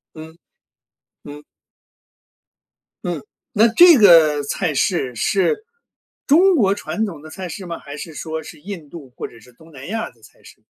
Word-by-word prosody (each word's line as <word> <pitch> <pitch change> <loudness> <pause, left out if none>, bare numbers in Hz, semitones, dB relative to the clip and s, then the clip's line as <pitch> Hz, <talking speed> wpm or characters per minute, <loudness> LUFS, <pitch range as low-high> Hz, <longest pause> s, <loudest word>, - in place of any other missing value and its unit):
嗯， 160 +1 -11 0.9
嗯。 145 +1 -11 1.6
嗯， - - -3 0.3
那 225 -1 +4
这 345 +8 +7
个 165 - +6
菜 155 +2 -2
式 135 -5 0
是 205 - 0 0.6
中 360 +6 +5
国 200 -9 +3
传 215 +1 -3
统 165 -7 -9
的 155 - -12
菜 185 0 -7
式 190 +4 -8
吗？ 170 -2 -6
还 145 0 -10
是 160 +2 -8
说 160 +1 -5
是 150 - -12
印 170 -5 -9
度 145 -7 -11
或 - - -5
者 115 - -17
是 125 +3 -19
东 160 +5 -19
南 135 -1 -11
亚 225 +2 -4
的 115 - -29
菜 - - -20
式？ - - -18
165 Hz, 180 characters per minute, -20 LUFS, 150-205 Hz, 1.6 s, 这